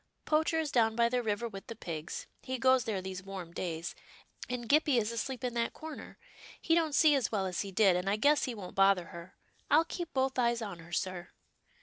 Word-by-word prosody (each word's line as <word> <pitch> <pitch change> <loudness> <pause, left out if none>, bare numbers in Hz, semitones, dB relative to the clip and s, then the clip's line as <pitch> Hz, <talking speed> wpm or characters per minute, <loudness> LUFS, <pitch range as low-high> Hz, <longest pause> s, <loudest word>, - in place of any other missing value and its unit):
Poacher 315 +1 +2
is 310 -3 -2
down 225 -2 +3
by 235 0 +3
the 250 0 0
river 220 0 -1
with 195 -3 -9
the 230 - -6
pigs. 165 -5 -6 0.2
He 260 0 -4
goes 260 0 +4
there 200 -4 -2
these 185 -1 -5
warm 185 -3 -8
days, 170 -1 -4 0.6
and 245 -2 -4
Gippie 290 -1 +4
is 220 0 -1
asleep 250 +3 -4
in 250 -1 -1
that 235 -1 -1
corner. 315 -1 -9 0.4
He 325 - +1
don't 320 -3 +2
see 305 0 +6
as 270 -5 +1
well 200 -3 0
as 180 -2 -2
he 200 - -5
did, 190 -1 +4
and 180 +2 -1
I 200 - +2
guess 285 +7 +3
he 250 - -4
won't 190 -4 -8
bother 195 -3 +3
her. 170 +1 -10 0.3
I'll 315 +3 +5
keep 340 -1 -5
both 265 -1 0
eyes 235 -1 +2
on 195 -5 -6
her, 165 +1 -13
sir." 175 -1 -3
230 Hz, 225 wpm, -31 LUFS, 190-265 Hz, 0.6 s, see